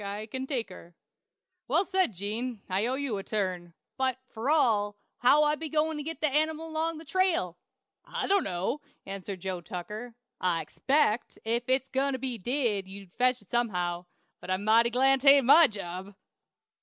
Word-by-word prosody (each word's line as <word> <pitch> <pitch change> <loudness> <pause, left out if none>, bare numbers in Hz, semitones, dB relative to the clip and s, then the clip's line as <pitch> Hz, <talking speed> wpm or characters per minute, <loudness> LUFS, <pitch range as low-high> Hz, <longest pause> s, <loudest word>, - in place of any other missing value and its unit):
I 200 +2 -4
can 260 +4 -5
take 250 -7 -2
her." 175 -2 -13 0.7
"Well 330 +10 +2
said, 375 -7 +1
Gene. 215 +4 -3
I'll 200 +7 0
owe - - 0
you 265 -7 -2
a - - -6
turn. 185 -5 -3 0.2
But, 260 -2 +1
fur 235 +1 -4
all, 215 -9 +2 0.2
how 295 +4 +5
be 320 +1 -6
I - - -10
goin' 315 0 0
to - - -3
get 320 +2 -6
that 305 -3 +1
animile 315 +2 0
'long 320 +1 -1
the 320 - -10
trail?" 340 - +1 0.5
"I - - -4
dono!" 275 - 0 0.2
answered 195 -1 -6
Joe 185 -1 -3
Tucker. 210 +8 -7 0.2
"I 170 -3 +1
expect, 240 - 0
if 235 +2 0
it's 265 0 +2
got 275 +1 +1
to 260 - -2
be 255 -2 -3
did, 225 -3 0
you'll 195 -1 -9
fetch 250 -2 +3
it 195 - -27
somehow. 180 -7 -1 0.3
But - - -11
I'm 185 +2 -1
mighty 225 +2 +5
glad 265 +2 +3
'tain't 275 -1 +7
my 310 +5 +8
job!" 190 -2 -7
240 Hz, 180 wpm, -28 LUFS, 195-285 Hz, 0.7 s, my